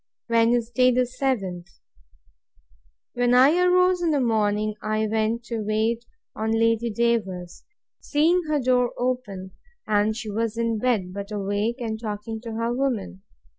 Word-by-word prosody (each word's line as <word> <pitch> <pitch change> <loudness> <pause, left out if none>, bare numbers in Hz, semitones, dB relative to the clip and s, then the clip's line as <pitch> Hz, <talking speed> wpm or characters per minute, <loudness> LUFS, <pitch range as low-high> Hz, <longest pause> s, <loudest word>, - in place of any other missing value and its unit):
Wednesday, 235 +2 +3
the 250 +1 +2
seventh. 215 -9 -3 1.4
When 245 0 +2
I 270 +6 +6
arose 365 0 +3
in 340 - +1
the 295 -2 +2
morning, 215 -3 +1
I 215 0 0
went 220 +2 0
to 230 -1 -4
wait 220 +3 0 0.3
on 220 +1 -1
Lady 230 +1 +2
Davers, 205 -6 -1 0.4
seeing 325 +5 +2
her 305 -1 +1
door 250 -1 +2
open; 230 -7 -3 0.3
and 215 +1 +1
she 220 -3 -5
was 225 +1 -2
in 230 -1 0
bed, 210 -7 0
but 200 +1 -6
awake, 205 +4 -2
and 220 -2 -4
talking 220 0 -5
to 230 -1 -7
her 230 +1 -1
woman. 240 - -2
230 Hz, 140 wpm, -24 LUFS, 210-250 Hz, 1.4 s, I